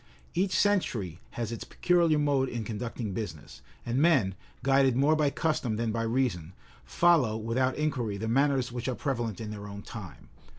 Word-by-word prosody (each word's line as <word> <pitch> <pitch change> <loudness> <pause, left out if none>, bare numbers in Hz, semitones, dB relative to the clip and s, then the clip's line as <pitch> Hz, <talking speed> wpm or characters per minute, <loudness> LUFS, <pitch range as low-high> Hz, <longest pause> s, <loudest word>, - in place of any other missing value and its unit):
Each 185 +2 +1
century 115 - +1 0.2
has 115 -2 -2
its 115 - -5
peculiar 170 -3 +2
mode 140 -3 +2
in 120 -2 -3
conducting 110 0 -4
business; 90 -7 -6 0.2
and 120 +2 0
men, 135 - +4 0.3
guided 135 -1 +4
more 145 +4 +4
by 150 -2 +2
custom 140 -7 -1
than 115 0 -1
by 115 +1 -1
reason, 115 -8 -1 0.3
follow, 155 -11 +3
without 120 +4 0
inquiry, 130 -9 -1
the 110 +2 -3
manners 135 +1 +2
which 120 0 -4
are 130 - -1
prevalent 120 -8 -2
in 110 -2 -5
their 105 -1 -7
own 100 0 -8
time. 100 -8 -10
120 Hz, 170 wpm, -29 LUFS, 110-140 Hz, 0.3 s, men